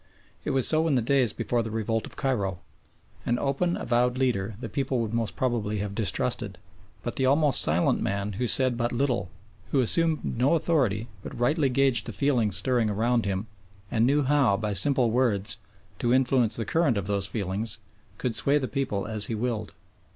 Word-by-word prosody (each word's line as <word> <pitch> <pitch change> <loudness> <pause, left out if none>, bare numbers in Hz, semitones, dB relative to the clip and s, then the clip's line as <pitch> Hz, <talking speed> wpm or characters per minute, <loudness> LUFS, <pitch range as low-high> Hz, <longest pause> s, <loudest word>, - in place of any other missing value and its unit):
It - - -3
was 130 -2 +5
so 160 +1 +3
in 150 - +2
the 125 - +2
days 130 -2 +2
before 120 +2 -1
the 110 - -4
revolt 115 0 -2
of - - -8
Cairo. 105 -10 -1 0.7
An 120 - 0
open 140 +7 0
avowed 125 +1 +1
leader 115 -6 -1
the - - -5
people 135 -3 -2
would 115 -1 -3
most 115 -2 -2
probably 115 -5 -1
have 100 0 -4
distrusted, 105 -2 -1 0.5
but 120 - -5
the 130 - +2
almost 145 -1 +3
silent 80 +3 +1
man 100 +1 -2
who 120 +6 -2
said 130 0 +3
but 120 0 -1
little, 120 -7 -1 0.4
who 140 - +1
assumed 160 +6 +2
no 130 +7 +1
authority 130 - 0
but - - -8
rightly 140 +3 +2
gauged 130 -4 +3
the - - -5
feelings 125 -7 +1
stirring 120 -4 +1
around 115 +3 +1
him 95 +1 -2 0.5
and 115 +1 +2
knew 145 +2 +2
how, 135 -7 +3
by 105 -1 -2
simple 120 +4 +2
words, 110 -5 0 0.4
to 120 - 0
influence 125 -4 +2
the 115 - -2
current 150 -3 +1
of 100 - -2
those 100 -1 0
feelings, 100 +2 -3 0.4
could 120 -3 -3
sway 140 +7 +2
the 135 -3 -2
people 125 -9 -2
as 105 -1 -2
he 115 - -3
willed. 110 -2 -3
120 Hz, 190 wpm, -26 LUFS, 105-135 Hz, 0.7 s, was